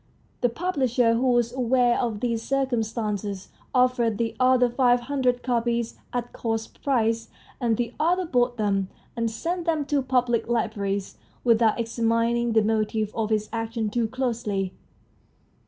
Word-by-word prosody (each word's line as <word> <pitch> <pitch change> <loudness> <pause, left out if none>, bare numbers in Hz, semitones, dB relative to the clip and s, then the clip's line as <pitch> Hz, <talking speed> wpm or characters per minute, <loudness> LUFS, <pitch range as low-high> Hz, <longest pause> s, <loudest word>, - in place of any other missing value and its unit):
The 245 - +3
publisher, 255 -6 +1
who 250 +3 +2
was 240 0 +1
aware 245 -1 +2
of 225 -4 -2
this 235 -2 0
circumstance, 220 -7 -2 0.2
offered 250 -4 +2
the 230 0 -1
author 255 -1 +5
five 245 0 +3
hundred 250 -1 0
copies 235 -2 -1
at 245 -1 -3
cost 225 -1 -4
price, 230 -4 +1 0.3
and 235 -4 +1
the 240 -1 -2
author 355 +4 +2
bought 245 -5 +1
them, 195 -3 0 0.3
and 230 -1 0
sent 335 +10 -3
them 315 -4 0
to 285 -1 +1
public 250 -3 +1
libraries, 205 -4 -1 0.3
without 230 -2 +3
examining 230 0 +1
the 220 -1 +4
motive 215 0 0
for 220 -1 -2
his 215 -1 0
action 225 -1 -2
too 235 0 0
closely. 220 -6 -2
235 Hz, 140 wpm, -25 LUFS, 225-250 Hz, 0.3 s, author